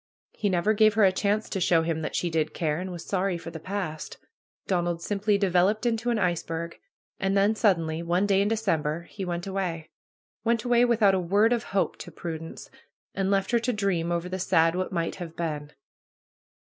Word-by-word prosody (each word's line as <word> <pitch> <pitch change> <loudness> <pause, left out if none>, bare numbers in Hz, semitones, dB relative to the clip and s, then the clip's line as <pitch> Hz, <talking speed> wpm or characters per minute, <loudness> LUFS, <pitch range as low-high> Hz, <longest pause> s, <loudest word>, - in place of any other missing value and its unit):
He 205 - -1
never 185 +3 +2
gave 215 0 +4
her 220 - +4
a 190 - +6
chance 205 +3 0
to 195 - -2
show 165 -1 +3
him 160 -1 -1
that 155 - -4
she 175 - -1
did 155 -1 -1
care, 155 -1 -1
and 185 +1 -5
was 175 -2 -7
sorry 190 -2 0
for 165 - -8
the 160 - -7
past. 180 -4 -5 0.5
Donald 175 -2 0
simply 205 +3 0
developed 195 +3 +2
into 235 0 0
an 235 - +1
iceberg. 170 -3 -2 0.4
And 195 +1 +1
then 200 +2 +4
suddenly, 165 -7 +1
one 175 +3 +1
day 195 -1 +3
in 200 - +2
December, 170 -8 0
he 195 +3 -8
went 175 -1 -3
away; 185 -5 -3 0.5
went 230 -1 +1
away 245 0 +4
without 220 -5 +4
a 190 - +2
word 200 +6 +3
of 235 - -2
hope 195 0 -1
to - - -9
Prudence! 165 -1 -7 0.4
And 195 -1 -1
left 195 +1 +1
her 235 - +4
to 240 +2 0
dream 195 -6 0
over 170 +1 -1
the 185 +1 -4
sad 165 -2 +3
What 185 +2 -2
Might 170 -2 -2
Have 170 -3 -7
Been. 150 -3 -4
185 Hz, 200 wpm, -27 LUFS, 170-205 Hz, 0.5 s, a